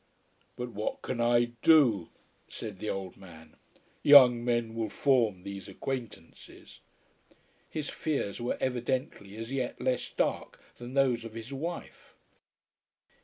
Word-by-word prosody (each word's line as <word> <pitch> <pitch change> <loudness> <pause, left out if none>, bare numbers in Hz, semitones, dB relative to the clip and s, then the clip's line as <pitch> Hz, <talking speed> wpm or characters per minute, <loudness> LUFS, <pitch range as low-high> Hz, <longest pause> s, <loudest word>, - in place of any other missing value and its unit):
"But 125 0 -5
what 105 0 -4
can 120 -2 -3
I 120 0 +3
do?" 125 - +5 0.4
said 105 -4 -8
the 110 - -4
old 95 -2 -5
man. 80 -4 -14 0.5
"Young 125 -5 +8
men 120 -2 0
will 115 -1 -2
form 115 -7 +1
these 100 0 -7
acquaintances." 115 -4 -8 0.9
His 155 -2 -4
fears 135 -9 -3
were 120 - -2
evidently 125 -5 -2
as 115 +2 -6
yet 130 -2 -3
less 130 -1 -1
dark - - -2 0.2
than 120 +2 -9
those 130 -4 +2
of 115 -1 -9
his 115 +4 -7
wife. 165 +6 -7
120 Hz, 125 wpm, -29 LUFS, 105-130 Hz, 0.9 s, Young